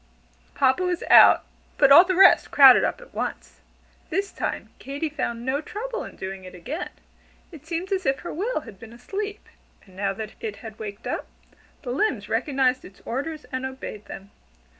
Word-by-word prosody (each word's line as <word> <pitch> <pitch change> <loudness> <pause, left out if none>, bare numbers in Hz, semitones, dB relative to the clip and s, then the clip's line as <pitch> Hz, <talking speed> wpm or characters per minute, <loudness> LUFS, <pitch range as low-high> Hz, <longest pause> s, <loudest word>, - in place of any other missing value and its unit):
Papa 265 +4 +2
was 360 -1 -1
out, - - +8 0.3
but 275 - +5
all 300 +5 +10
the 370 0 -1
rest 385 +1 +6
crowded 270 -3 +8
up - - -2
at - - -16
once. - - -5 0.5
This 395 +1 -2
time - - -4
Katy 285 +3 -4
found 235 -5 -4
no 270 +3 0
trouble 465 +9 -5
in - - -10
"doing 190 0 -7
it 185 0 -11
again." 270 - -5 0.6
It 315 -2 -13
seemed 345 +4 -4
as 380 -2 -1
if 270 0 0
her 345 - -6
will 405 +3 -2
had 215 -8 -13
been 225 +1 -12
asleep; 405 - -6 0.4
and 190 -2 -19
now 195 +1 -1
that 215 +1 -7
it 215 -2 -5
had 220 +1 -11
waked 205 -2 -8
up, - - -3 0.6
the 245 - -4
limbs 245 - -1
recognized 255 +2 +1
its 190 - -15
orders 300 +5 -4
and 260 0 -3
obeyed 265 -5 -7
them. 195 +1 -10
265 Hz, 180 wpm, -24 LUFS, 220-345 Hz, 0.6 s, all